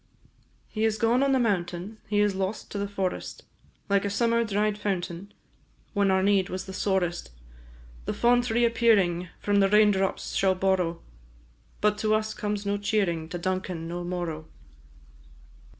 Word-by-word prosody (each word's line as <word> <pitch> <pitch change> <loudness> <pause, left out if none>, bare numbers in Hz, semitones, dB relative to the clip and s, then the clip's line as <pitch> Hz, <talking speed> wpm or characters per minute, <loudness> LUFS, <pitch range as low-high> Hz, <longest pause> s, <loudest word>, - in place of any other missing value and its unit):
He 215 - -3
is 220 -1 +2
gone 230 +3 +2
on 275 0 +3
the 265 - +4
mountain, 195 -2 -1
He 205 -1 +2
is 205 -1 +2
lost 190 +2 -3
to 205 - -3
the 200 - -1
forest, 195 -2 -4 0.4
Like 200 -1 +2
a 200 - -1
summer 235 +3 +2
dried 210 -1 0
fountain, 190 -1 -3 0.6
When 200 -2 +2
our 190 0 +3
need 195 -2 +2
was 185 +1 -4
the 190 - -8
sorest. 185 - -1 0.8
The - - -2
font 245 +1 +3
re 235 +2 +3
appearing, 200 -7 +2
From 205 0 +1
the 195 0 +4
rain 210 0 +6
drops 195 -1 -1
shall 190 -1 +2
borrow; 185 -3 0 0.8
But 210 0 +2
to 215 0 +2
us 215 0 -1
comes 210 -1 -3
no 200 0 0
cheering, 195 -6 -1
To 175 - -4
Duncan 185 -2 -3
no 175 +1 -4
morrow! 175 -3 -4
200 Hz, 165 wpm, -27 LUFS, 180-215 Hz, 0.8 s, rain